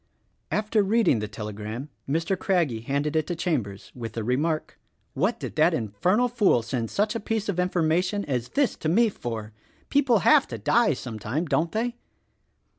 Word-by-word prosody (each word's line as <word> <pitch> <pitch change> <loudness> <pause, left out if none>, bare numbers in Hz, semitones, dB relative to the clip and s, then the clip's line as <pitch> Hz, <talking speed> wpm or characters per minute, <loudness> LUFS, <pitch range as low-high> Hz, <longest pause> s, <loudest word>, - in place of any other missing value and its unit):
After 215 0 +1
reading 205 - +3
the 105 - -3
telegram 105 +5 -6 0.2
Mr. 165 +6 +1
Craggie 170 - 0
handed 140 +5 -1
it 155 -1 +1
to 175 - -2
Chambers 125 - -2
with 115 -3 -6
the 115 - -3
remark, 150 +7 -1 0.3
"What - - 0
did - - -6
that - - +4
infernal 180 - +1
fool 210 - +2
send 120 -1 -3
such 210 +2 0
a 230 - -2
piece 220 0 -2
of 190 -3 -1
information 180 +2 +1
as 125 -4 -2
that 280 -4 +2
to 155 - -1
me 225 +7 +4
for. 110 - -6 0.4
People 270 -5 +4
have - - +6
to 115 - -6
die 225 - +3
sometime, 125 - -4
don't 160 +2 0
they?" 235 +2 -2
160 Hz, 170 wpm, -26 LUFS, -, 0.4 s, have